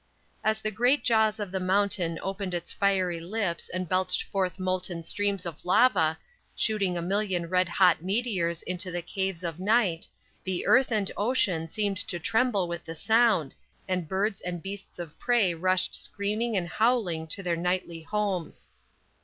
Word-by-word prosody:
As 220 0 +1
the 215 - +1
great 245 +7 +2
jaws 220 -2 +3
of 205 -3 -4
the 190 - -1
mountain 185 -3 +1
opened 195 -1 -3
its 175 0 -4
fiery 190 -4 +1
lips 175 0 -3
and 185 0 -3
belched 185 +1 +2
forth 190 -3 -2
molten 185 -2 -2
streams 200 +2 -1
of 165 -3 -7
lava, 180 -6 +4 0.4
shooting 200 -5 +1
a 170 - -2
million 190 -1 0
red 180 0 +2
hot 175 -2 +4
meteors 185 -4 0
into 185 +1 -2
the 175 -1 -3
caves 190 -2 -3
of 170 -1 -4
night, 200 -4 +2 0.4
the 185 -2 -3
earth 260 -1 +4
and 210 -3 0
ocean 205 -8 +1
seemed 200 +2 -1
to 180 - -3
tremble 220 0 +1
with 170 0 -5
the 165 - -7
sound 220 - +3 0.3
and 180 -3 -1
birds 195 +2 0
and 175 -2 -5
beasts 195 0 -8
of 170 -4 -8
prey 235 -7 +2
rushed 185 +2 +1
screaming 210 +2 -1
and 175 -2 -1
howling 205 -7 +1
to 195 +5 -3
their 175 -2 0
nightly 175 -1 -2
homes. 195 -2 -3
185 Hz, 165 wpm, -27 LUFS, 175-210 Hz, 0.4 s, lava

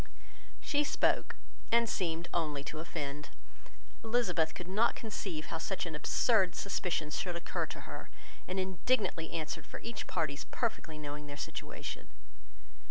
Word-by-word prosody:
She 290 0 +3
spoke, - - +3 0.4
and 235 0 +6
seemed 170 -4 0
only 150 -4 +1
to 155 +1 -4
offend. 150 -3 -3 0.7
Elizabeth 220 -9 +3
could 180 - -5
not 215 +6 +4
conceive 190 -8 -3
how 165 - 0
such 190 +3 -1
an 165 - -3
absurd 185 +4 +4
suspicion 175 -6 0
should 175 +3 -1
occur 170 - -1
to - - -6
her, - - -7 0.4
and 185 +1 0
indignantly 185 -2 +2
answered 160 -2 -2
for - - -6
each 230 -2 -4
party's 155 -4 0
perfectly 215 -9 -1
knowing 150 0 -5
their 145 0 -6
situation. - - -4
170 Hz, 140 wpm, -34 LUFS, 155-200 Hz, 0.7 s, and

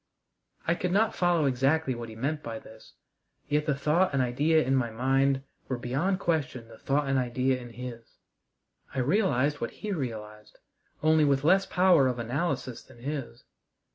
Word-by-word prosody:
I 165 - +3
could 180 +1 -2
not 215 +4 +2
follow 175 -4 +2
exactly 135 +2 +1
what 120 -1 -7
he 110 - -10
meant 145 +6 -2
by 115 -4 -5
this, 110 0 -15 0.5
yet 150 +1 0
the 150 - +2
thought 150 +4 +2
and 140 - +1
idea 150 +6 +2
in 135 - +1
my 125 -3 +1
mind 135 +3 +1 0.2
were 130 - -2
beyond 145 +11 -1
question 145 -9 -1
the 110 - -14
thought 145 0 0
and 135 -1 +2
idea 130 +1 0
in 120 - -9
his. 120 -1 -9 0.8
I - - 0
realized 145 - +1
what 115 - -1 0.2
he 210 - -2
realized, 110 - -6 0.5
only 155 0 +5
with 140 -2 +2
less 190 +5 +4
power 180 -7 +4
of 125 -1 -1
analysis 130 +1 -2
than 130 - -18
his. 135 -4 -5
135 Hz, 170 wpm, -28 LUFS, 120-155 Hz, 0.8 s, only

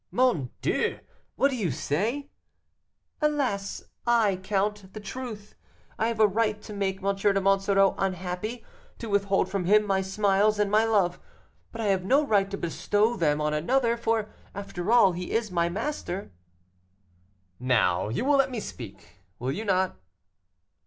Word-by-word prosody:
"Mon 235 - +1
Dieu! - - 0 0.4
What 275 - +3
do - - -2
you 205 -8 -1
say?" 220 - -2 0.9
"Alas 275 -10 -1 0.2
I 225 -5 +3
count, 195 +1 -2
the 215 - -7
truth; 210 0 -7 0.5
I 225 - +2
have 230 -1 -3
a 215 - +7
right 210 +1 +1
to 210 - -8
make 195 -2 -2
M. 200 0 +1
de 195 0 +2
Monsoreau 195 0 +3
unhappy, 190 +5 -3 0.3
to 230 - -7
withhold 200 -2 +2
from 190 -1 -2
him 210 +3 +5
my 195 -1 +1
smiles 200 +2 +2
and 205 -1 +1
my 215 +1 +4
love, 200 -6 +1 0.5
but 230 - -6
I - - -1
have 190 -2 +1
no 275 +10 +3
right 200 -5 +2
to 200 - -4
bestow 205 +7 0
them 150 -5 +1
on 150 0 0
another: 235 - +1
for, 225 -2 -1 0.2
after 200 0 -4
all, 235 -5 +6
he 180 +1 -5
is 225 -3 0
my 170 -1 +1
master." 200 - -4 1.3
"Now, 115 -7 +2
you 120 - -2
will 285 0 +4
let 270 -1 +3
me 245 -3 -4
speak, 115 - -10 0.2
will 125 +2 -2
you 215 +10 -4
not?" 190 -2 +1
200 Hz, 160 wpm, -27 LUFS, 185-225 Hz, 1.3 s, a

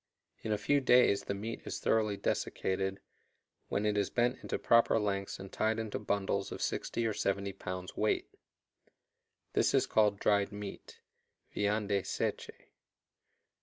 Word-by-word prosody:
In 110 - -3
a 105 - +2
few 140 +7 +2
days 125 -5 +4
the 100 - -2
meat 110 +3 -5
is - - -5
thoroughly 105 -2 +1
desiccated, 95 0 -1 0.7
when 100 - -1
it 105 -1 +2
is 100 - 0
bent 120 +1 +1
into - - -3
proper 115 -1 +4
lengths 100 -2 -2
and 95 0 -9
tied 110 +1 0
into 110 -2 -3
bundles 100 -1 -1
of - - -5
60 115 - -2
or 110 - +1
70 100 -1 -1
pounds 90 0 -6
weight. 105 0 +1 1.3
This - - +3
is - - +4
called 105 -2 +2
dried 100 -1 +2
meat 105 -1 -8 0.5
(viande 105 -1 +1
seche). - - -2
105 Hz, 145 wpm, -32 LUFS, 100-110 Hz, 1.3 s, days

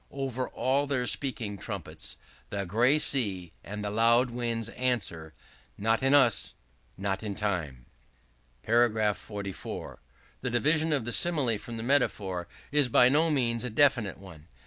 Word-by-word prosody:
Over 130 -2 -4
all 140 +2 0
their 130 -3 -1
speaking 115 -7 -2
trumpets - - -7 0.3
the 100 -1 -3
gray 120 - +3
sea 100 - +1
and 105 +1 -6
the 105 - -2
loud 115 +3 +3
winds 115 -2 -3
answer, 105 -11 -2 0.4
Not 115 +3 +1
in 135 +2 +4
us; 125 -6 +3 0.4
not 95 0 -2
in 105 -2 -4
Time." 80 -13 -3 0.8
§ 110 -2 +3
44. 100 -2 -7 0.4
The 130 - -2
division 155 +6 +2
of 140 -6 0
the 120 - -3
Simile 135 -7 +2
from 115 +1 -8
the 110 - -5
Metaphor 100 -9 0 0.2
is 145 -3 +3
by 125 +1 +6
no 155 +4 +3
means 120 -6 0
a 125 - -2
definite 115 -4 +2
one. 85 -6 -14
115 Hz, 145 wpm, -28 LUFS, 100-130 Hz, 0.8 s, by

